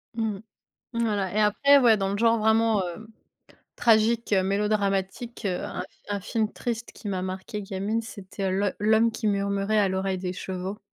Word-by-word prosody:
Mmh. 220 -3 -2 0.6
Voilà 210 -5 0
et 215 - +3
après, 280 +7 +5
ouais, 235 -4 +5
dans 195 -1 -1
le 200 - -1
genre 230 +1 +3
vraiment, 220 -1 +3
hem, 220 +6 -9 0.7
tragique, 225 -1 +3
heu, 190 -1 +3
mélodramatique, 200 +3 -1
heu, 185 -2 -1
un - - -4
f - - -6 0.2
un 205 - -1
film 215 +2 -1
triste 235 -1 -4
qui 215 - -9
m'a 190 -2 -2
marqué 190 +3 -5
gamine, 200 +4 -2
c'était 200 -3 -5
L'Ho 195 +2 +1
L’Homme 220 +2 +4
qui 225 0 -5
murmurait 200 +1 +1
à 200 - +3
l’oreille 190 0 -1
des 180 0 -4
chevaux. 190 +2 -5
205 Hz, 175 wpm, -26 LUFS, 195-225 Hz, 0.7 s, après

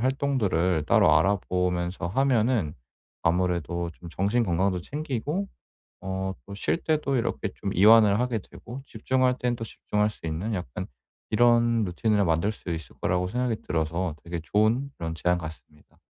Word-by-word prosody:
활동들을 115 - +1
따로 100 -10 +5
알아보면서 90 -1 0
하면은 115 - +1 0.5
아무래도 85 0 0
좀 85 +2 -12
정신 100 +8 +1
건강도 90 -1 +1
챙기고 150 - -3 0.6
어 95 0 -3
또 100 - -9
쉴 100 - 0
때도 155 -4 0
이렇게 115 -3 -1
좀 100 -2 -4
이완을 105 +1 +6
하게 125 -2 0
되고 120 +6 -10
집중할 130 +2 +1
땐 125 -1 0
또 115 - -6
집중할 105 -1 -1
수 85 - -9
있는 85 +8 -2
약간 90 -1 -4 0.5
이런 120 0 +4
루틴을 105 +3 +1
만들 85 +5 +1
수 105 - -9
있을 80 -5 -5
거라고 90 0 0
생각이 125 0 -1
들어서 80 +1 -1
되게 85 0 -4
좋은 110 +9 +1
그런 80 -1 -3
제안 90 +2 +1
같습니다. 80 -2 -11
100 Hz, 325 characters per minute, -26 LUFS, 85-120 Hz, 0.6 s, 이완을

